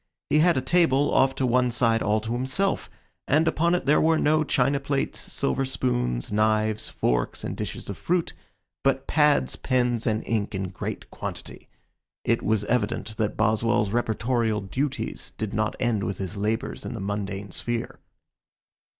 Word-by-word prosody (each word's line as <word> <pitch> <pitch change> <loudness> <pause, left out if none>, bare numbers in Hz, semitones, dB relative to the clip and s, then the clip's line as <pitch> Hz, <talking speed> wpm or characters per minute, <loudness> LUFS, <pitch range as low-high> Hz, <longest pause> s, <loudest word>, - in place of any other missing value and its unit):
He 150 - +5
had 170 0 +4
a - - +2
table 145 -2 +3
off 135 0 +4
to 130 - 0
one 125 0 +3
side 115 -1 +2
all 105 +1 +2
to 110 +1 -5
himself, 130 +11 0 0.4
and 155 +4 +3
upon 170 +2 +2
it 180 - -2
there 150 +2 +4
were 160 0 +4
no 155 +1 +3
china 140 -1 +2
plates, 140 0 -1
silver 135 - -1
spoons, - - -1
knives, 110 0 +1
forks, - - -1
and - - -3
dishes - - -5
of 100 - -6
fruit, 175 -1 0 0.5
but 135 -1 +1
pads, 150 -1 +3
pens, 125 -3 0
and 110 0 0
ink 110 -3 -1
in 95 -1 -2
great 95 - -6
quantity. - - -7 0.5
It - - +1
was 110 -1 +1
evident 110 -1 -1
that 105 -1 -1
Boswell's 110 -1 +2
reportorial 115 -1 0
duties 140 +1 -3
did 110 -2 -3
not 110 0 0
end 115 -5 +1
with 100 - -2
his 95 +1 -5
labors 105 +2 -2
in - - -5
the - - -5
mundane 100 0 -4
sphere. 120 +4 -3
115 Hz, 165 wpm, -25 LUFS, 105-135 Hz, 0.5 s, He